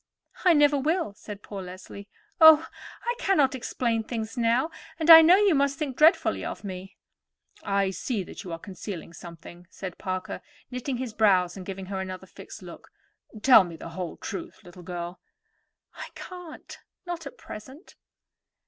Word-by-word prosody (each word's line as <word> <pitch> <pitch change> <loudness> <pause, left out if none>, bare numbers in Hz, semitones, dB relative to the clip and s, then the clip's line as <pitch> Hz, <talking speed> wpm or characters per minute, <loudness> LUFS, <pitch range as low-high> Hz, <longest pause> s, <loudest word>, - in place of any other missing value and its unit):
"I 360 -2 +6
never 290 -2 +4
will," 315 - 0
said 205 0 -10
poor 200 -2 -7
Leslie. 185 +2 -10 0.3
"Oh, 315 -1 +9 0.4
I 475 - 0
cannot 295 -9 +2
explain 235 -2 -1
things 225 -1 -5
now, 240 +6 +1 0.3
and 325 0 +5
I 325 0 +13
know 335 +3 +7
you 405 -2 +4
must 280 -1 +1
think 285 -5 -3
dreadfully 315 +6 +4
of - - -6
me." 190 0 -8 0.6
"I 195 -1 0
see 210 +1 -3
you 180 0 -9
are 165 - -4
concealing 185 -2 -8
something," 170 +1 -12
said 185 -1 -8
Parker, 185 -2 -4 0.3
knitting 250 +1 -3
his 245 -3 -5
brows 185 -5 +3
and 185 -2 -9
giving 195 -1 -6
her 190 0 -4
another 185 0 -6
fixed - - -12
look. - - -12 0.5
"Tell 250 -6 +8
me 170 -2 -8
the 165 - -9
whole 170 0 -6
truth, 335 -9 -7
little 180 -1 -13
girl." 175 0 -6 0.7
"I - - -8
can't; 355 -3 -10 0.3
not 340 -4 -5
at - - -11
present." 265 - -11
220 Hz, 160 wpm, -26 LUFS, 185-295 Hz, 0.7 s, I